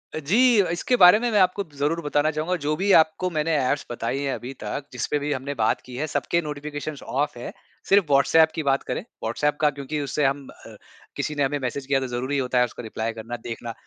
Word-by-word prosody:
अ, - - -2
जी 220 - +4
इसके 175 +8 0
बारे 180 +4 +9
में 240 +1 0
मैं 210 - +3
आपको 185 +2 +2
ज़रूर 150 +4 0
बताना 150 0 +1
चाहुँगा। 160 +4 -1
जो 150 +1 0
भी 195 +5 +1
आपको 160 +3 -2
मैंने 160 -1 0
ऐप्स 140 +1 0
बताई 120 +3 -2
है 140 -1 -1
अभी 125 +2 -7
तक 140 - -4
जिस - - -3
पे 150 - +2
भी 145 +1 -3
हमने 135 +1 -4
बात - - +1
की 125 - -11
है 155 +4 -2
सबके 170 +3 0
नोटिफिकेशन्स 150 -1 -6
ऑफ़ 140 -2 -2
है। - - -6 0.4
सिर्फ 200 -1 +5
व्हाट्सऐप 155 +3 +5
की 160 - -2
बात 135 -1 +1
करें, - - -2 0.2
व्हाट्सऐप 145 +7 0
का 150 - +5
क्योंकि 145 +2 -4
उससे 145 +1 -1
हम 135 0 -1
अ, 115 - -13 0.4
किसी 150 - -3
ने 145 - +1
हमें 140 +2 0
मैसेज 135 +1 -4
किया 135 -1 +2
तो 130 - -3
ज़रूरी 130 +3 -2
होता 125 -1 0
है 125 - +5
उसको - - -9
रिप्लाई 110 0 -4
करना, 115 +2 -6
देखना। 115 0 -6
145 Hz, 235 wpm, -24 LUFS, 130-160 Hz, 0.4 s, बारे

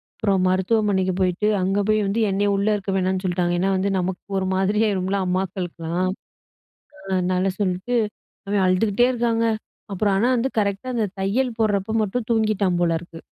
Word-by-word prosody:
அப்புறம் 195 -3 +1
மருத்துவமனைக்கு 190 0 +1
போயிட்டு, 185 +3 +1
அங்கே 195 +2 +1
போய் 215 0 +3
வந்து 210 +4 0
என்னைய 200 +1 +1
உள்ள 200 +1 0
இருக்க 195 -1 -3
வேணான்னு 185 0 0
சொல்லிட்டாங்க. 175 -1 0
ஏன்னா 190 +2 +1
வந்து 195 +2 0
நமக்கு 180 0 -3
ஒரு 190 - 0
மாதிரியாயுருமில்ல 200 -1 +1
அம்மாக்களுக்கலாம். 180 -1 -2 1.0
அ - - -1
அதனால 185 +1 +1
சொல்லிட்டு, 190 +5 -1 0.5
அவன் 200 -1 +1
அழுதுக்கிட்டே 205 +5 +3
இருக்காங்க. 230 -1 0 0.5
அப்புறம் 195 +1 +1
ஆனா 225 +5 +2
வந்து 250 +3 0
கரெக்ட்டா 200 +4 -1
அந்த 220 -3 +1
தையல் 230 +5 0
போட்றப்போ 210 -1 0
மட்டும் 220 +3 -3
தூங்கிட்டான் 210 -5 +1
போல 165 -1 +2
இருக்கு. 170 -1 -11
195 Hz, 155 wpm, -22 LUFS, 185-215 Hz, 1.0 s, போய்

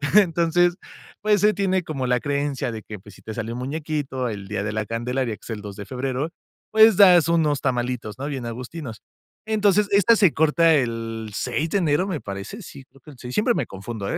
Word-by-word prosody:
Entonces, 175 -2 +4 0.5
pues, 210 -1 +2
se 210 0 +4
tiene 190 -2 +1
como 135 -5 -4
la 125 -1 +2
creencia 140 -2 -2
de 110 -1 -6
que, 105 -3 -9
pues, 100 -1 -15
si - - -17
te 110 - -6
sale 115 0 -4
un 120 - -5
muñequito 140 -2 -3
el 100 -2 -6
día 105 0 -3
de 105 - -2
La 110 -1 -2
Candelaria, 120 +1 -2
que - - -24
es - - -13
el 110 -2 -4
2 100 -1 -8
de 100 0 -8
febrero, 130 +3 -3 0.4
pues, 220 -2 +6
das 180 -5 +7
unos 155 -4 +2
tamalitos, 125 -4 -2
¿no? 140 - -3
Bien 135 -5 -4
agustinos. 120 +1 -7 0.5
Entonces, 210 -2 +3
esta 200 +3 +5
se 190 -7 +4
corta 160 +2 +4
el 115 -4 -2
6 145 +9 -2
de 200 - +2
enero, 165 +3 +1
me 170 -7 -3
parece, 100 - -7
sí, 140 -6 -11
creo 135 0 -23
que 150 - -13
el 130 - -16
6, 125 0 -7
siempre 240 +3 +2
me - - -2
confundo, 100 +1 -6
¿eh? - - -1
135 Hz, 220 wpm, -23 LUFS, 115-170 Hz, 0.5 s, das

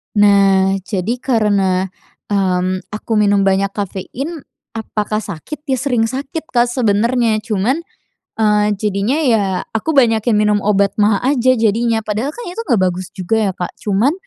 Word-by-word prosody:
Nah, 195 -2 +4
jadi 210 +4 -2
karena, 200 -7 +1 0.4
mmm, 185 -1 +1
aku 215 +2 -7
minum 200 -1 +3
banyak 195 0 +2
kafein 245 - -5 0.3
apakah 215 -1 -3
sakit? 245 - -8
Ya, 265 - +1
sering 245 -3 0
sakit, 275 +6 -5
Kak, 240 -1 +1
sebenarnya 230 -1 +1
cuman, 235 - 0 0.6
eee, 210 -1 +3
jadinya 210 +6 0
ya 225 -6 +3 0.3
aku 285 +8 -1
banyakin 225 -2 +3
minum 210 0 +2
obat 200 -1 +2
maag 205 +1 +2 0.2
aja 255 +2 +4
jadinya. 225 0 +1
Padahal 215 +6 -2
kan 480 - -8
itu 365 +6 -5
nggak 230 -8 +2
bagus 185 +1 -6
juga 190 +3 -1
ya, - - -1
Kak, 180 - -4
cuman 215 +8 +1
215 Hz, 145 wpm, -17 LUFS, 200-245 Hz, 0.6 s, Nah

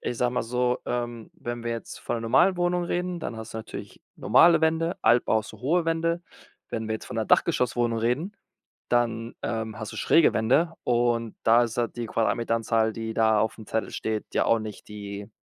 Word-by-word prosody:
Ich 120 - -3
sage 125 +1 +1
mal 125 - 0
so, 125 +1 0
ähm, 120 -2 -3
wenn 120 0 -6
wir 120 - -1
jetzt 115 -1 -6
von - - -2
'ner - - -4
normalen 135 +11 +4
Wohnung 175 0 +1
reden, 175 0 -2
dann 120 - -5
hast 110 0 -8
du - - -3
natürlich 110 - -9 0.2
normale 170 -1 +5
Wände, 160 +2 +1
Altbau 110 -1 +4
hast 110 - -7
du - - -13
hohe 165 +7 +1
Wände. 165 +1 0 0.5
Wenn 110 -1 -4
wir 110 - 0
jetzt 110 - -7
von - - -7
'ner 110 - 0
Dachgeschosswohnung 120 -2 +2
reden, 135 - -1 0.5
dann, 115 -1 0
ähm, 110 -1 -3
hast 110 - -6
du - - -8
schräge 165 - +4
Wände. 135 +10 +2
Und 120 -2 +1
da 115 +2 +6
ist 115 -1 -5
halt 120 0 -1
die 120 -1 -3
Quadratmeteranzahl, 115 0 +1
die 110 0 -5
da 110 -1 +3
auf'm 110 0 -2
Zettel 110 - -2
steht 110 -1 -3
ja - - +2
auch 115 - +4
nicht 110 -3 -8
die 100 0 -7
115 Hz, 200 wpm, -26 LUFS, 110-130 Hz, 0.5 s, da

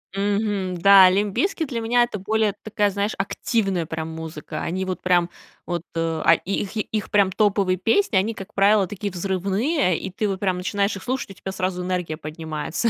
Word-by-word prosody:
Мгм, 200 -2 -1
да. 195 -1 +8
Limp 200 +1 0
Bizkit 370 -5 0
для 235 -3 -3
меня 240 +2 +3
это 225 -3 -3
более 215 +1 0
такая, 210 -1 +1
знаешь, 200 +2 -1
активная 195 -3 -1
прям 160 0 -5
музыка. 160 -1 -6
Они 185 +3 -2
вот 185 -1 -4
прям 175 -1 +3 0.4
вот, 175 -1 -2
э, 165 - -2 0.3
а 165 - +7
и 185 +4 -2
их 200 +2 -8
и - - +2
их 215 0 -4
прям 200 -2 +4
топовые 195 -2 +2
песни 225 - +2
они, 215 +4 +1
как 195 0 -10
правило, 200 -1 +4
такие 205 0 -5
взрывные, 195 - 0
и 190 - -5
ты 205 +3 -2
вот 195 -1 -2
прям 185 -2 0
начинаешь 200 +2 -1
их 190 - -8
слушать, 255 -4 -3
у - - -9
тебя 190 - -7
сразу 185 -1 -2
энергия 180 -4 -2
поднимается. 155 +6 -3
195 Hz, 200 wpm, -23 LUFS, 180-210 Hz, 0.4 s, да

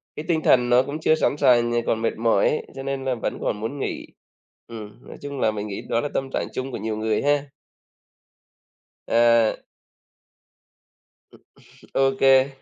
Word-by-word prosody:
cái 150 - -6
tinh 160 -2 +1
thần 125 -1 +4
nó 125 +1 +5
cũng 145 +3 -5
chưa 155 - +3
sẵn 155 - +1
sàng, 120 -4 +4
nh - - -1
còn 110 - 0
mệt 115 - -1
mỏi 115 -3 +2
ấy, - - -3
cho 135 - -6
nên 135 -1 -4
là 130 -1 0
vẫn 115 - -4
còn 105 - -2
muốn 115 +7 -5
nghỉ. - - -4 0.6
Ừm, 110 0 -11
nói - - -10
chung 140 -1 -6
là 110 - +2
mình 105 0 -5
nghĩ 100 - -5
đó 115 - +1
là 145 - -3
tâm 135 - -2
trạng - - -1
chung 130 +1 -4
của - - -4
nhiều 110 0 -4
người 110 0 0
ha? 145 0 +2 1.6
À! 115 -1 +4 2.4
OK. 135 0 +1
Vậy, 135 0 +5
125 Hz, 180 wpm, -23 LUFS, 110-135 Hz, 2.4 s, nó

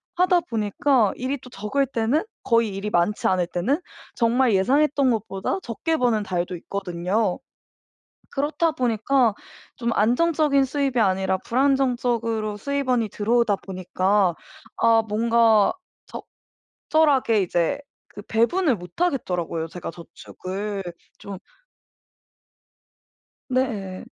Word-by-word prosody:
하다 360 0 +3
보니까 225 - +1
일이 260 +2 -3
또 250 - -12
적을 250 +7 -1
때는 240 - 0 0.2
거의 230 -1 +3
일이 195 +2 -5
많지 175 +4 +1
않을 180 -2 +1
때는 220 - -1 0.3
정말 235 0 +2
예상했던 275 +7 +3
것보다 205 - -2
적게 320 +8 -2
버는 240 -6 +1
달도 180 -2 -3
있거든요. 185 +2 -2 1.0
그렇다 310 +4 +1
보니까 245 -3 +1 0.4
좀 235 -1 -2
안정적인 280 +5 +2
수입이 270 -1 -1
아니라 190 -3 +2
불안정적으로 240 -5 0
수입원이 255 -3 -1
들어오다 220 0 +1
보니까 185 0 0 0.4
아 225 -1 +4
뭔가 225 - +3 0.9
적절하게 275 -9 +2
이제 175 +8 0 0.3
그 205 - -11
배분을 245 - +1
못 180 - -10
하겠더라고요. 180 - -1
제가 175 0 -7
저축을 195 +4 -7 0.3
좀 200 -1 -8 2.1
네. 225 -8 -2
230 Hz, 255 characters per minute, -23 LUFS, 195-270 Hz, 2.1 s, 아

